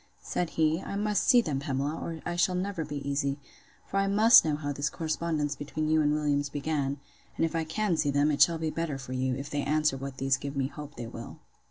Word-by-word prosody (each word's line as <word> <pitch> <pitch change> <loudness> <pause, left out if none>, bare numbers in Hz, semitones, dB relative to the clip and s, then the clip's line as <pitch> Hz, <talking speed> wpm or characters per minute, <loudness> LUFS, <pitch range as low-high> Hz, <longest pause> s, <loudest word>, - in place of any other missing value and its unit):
Said 175 -2 -2
he, 160 +2 +2
I - - -5
must 210 -1 0
see 245 -2 +6
them, 145 -10 -2
Pamela, 140 +1 -2
or 165 -1 -6
I 175 - -2
shall 180 +1 +2
never 185 -2 -2
be 145 -2 -6
easy; 140 0 0 0.5
for - - -3
I 195 0 +2
must 220 +4 +7
know 155 -2 0
how 145 -1 -3
this 145 +2 -1
correspondence 155 -2 -2
between 155 +2 -3
you 155 0 +4
and 150 -1 +2
Williams 145 -1 0
began: 145 -1 -2 0.4
and - - +2
if 165 - -3
I 165 -1 0
can 195 +3 0
see 145 - +1
them, 145 +2 +2
it 145 - -1
shall 170 -1 +6
be 160 -1 -2
better 165 -4 -2
for 130 -1 -7
you, 130 0 0
if 140 +2 -6
they 145 - -1
answer 150 -1 +1
what 135 0 -7
these 135 0 +2
give 140 +1 -6
me 135 - +1
hope 145 0 -9
they 120 - -6
will. 115 0 -9
150 Hz, 240 wpm, -29 LUFS, 140-165 Hz, 0.5 s, must